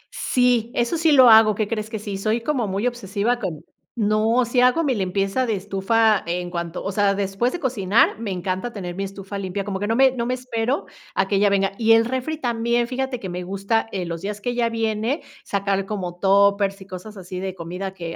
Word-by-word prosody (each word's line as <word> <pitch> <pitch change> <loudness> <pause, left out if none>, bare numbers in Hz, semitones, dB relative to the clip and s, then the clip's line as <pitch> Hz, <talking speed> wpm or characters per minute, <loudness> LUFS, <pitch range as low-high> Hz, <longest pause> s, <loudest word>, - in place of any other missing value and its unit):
Sí, 245 -2 +1
eso 240 +8 0
sí 325 -2 +3
lo 260 -3 +7
hago, 220 -2 +7
qué 215 -1 -1
crees 215 -1 -3
que 220 - -4
sí. 205 -2 -5
Soy 220 +3 0
como 250 -5 -1
muy 195 +5 -2
obsesiva 235 0 -1
con 165 -7 -5 0.3
No, 220 +3 +2
si 245 +1 +1
hago 250 +7 +4
mi 270 -3 +1
limpieza 195 +4 0
de 220 - +1
estufa 205 +3 +2
en 175 +1 -3
cuanto 170 0 -4
o 195 - -2
sea, 200 0 +2
después 195 +5 -1
de 355 - -4
cocinar, 225 -3 +2
me 225 -3 -4
encanta 185 +5 -3
tener 180 -5 -6
mi 195 - -3
estufa 195 +1 -7
limpia. 195 +1 -3
Como 195 -1 -4
que 205 - -2
no 225 - +1
me 265 0 +5
no 235 -2 -3
me 255 - 0
espero 250 +1 -2 0.3
a 190 - +1
que 200 0 +1
ella 205 0 +4
venga. 195 0 +1
Y 225 0 +5
el 225 0 +5
refri 260 +5 -2
también, 235 -2 0
fíjate 260 -1 -3
que 190 - -6
me 180 +1 -4
gusta, 200 +5 -1
eh, 185 -3 -3
los 170 0 -5
días 205 +1 -4
que 245 +4 -2
ella 240 -1 0
viene, 225 +4 -1 0.2
sacar 195 -1 -1
como 180 -4 -5
Tuppers, 200 0 +3
y - - -10
cosas 195 +3 -9
así 180 0 -7
de 190 0 -4
comida 180 +3 -5
que, 165 -2 -6
210 Hz, 225 wpm, -22 LUFS, 195-235 Hz, 0.3 s, lo